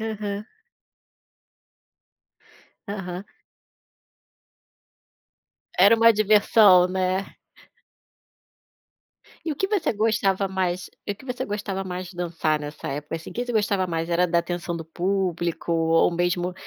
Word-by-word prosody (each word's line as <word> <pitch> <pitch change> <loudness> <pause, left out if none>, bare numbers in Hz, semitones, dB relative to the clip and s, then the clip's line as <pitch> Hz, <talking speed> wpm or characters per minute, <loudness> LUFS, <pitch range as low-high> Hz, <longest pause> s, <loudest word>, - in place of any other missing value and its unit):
Aham. 210 -2 -4 2.4
Aham. 190 -2 -5 2.5
Era 200 +5 +7
uma 230 0 +6
diversão, 210 -3 +5
né. 185 +1 -1 2.1
E 320 - -1
o - - -8
que 385 - 0
você 410 -5 +1
gostava 205 -3 +1
mais 185 -1 -2 0.2
o - - -1
que 240 - -17
você 250 -1 -4
gostava 205 -2 -3
mais 180 -1 -5
de 180 - -14
dançar 165 -3 -1
nessa 150 +1 -7
época, 145 +3 -4
assim 165 - -9
o - - -9
que 245 - -3
você 245 - -3
gostava 200 -3 +1
mais 165 -1 -3
era 175 +1 +3
da 170 0 +2
atenção 170 0 -3
do 165 - -6
público, 175 -1 -2
ou 165 0 +3
mesmo, 175 +1 0
185 Hz, 120 wpm, -24 LUFS, 175-205 Hz, 2.5 s, Era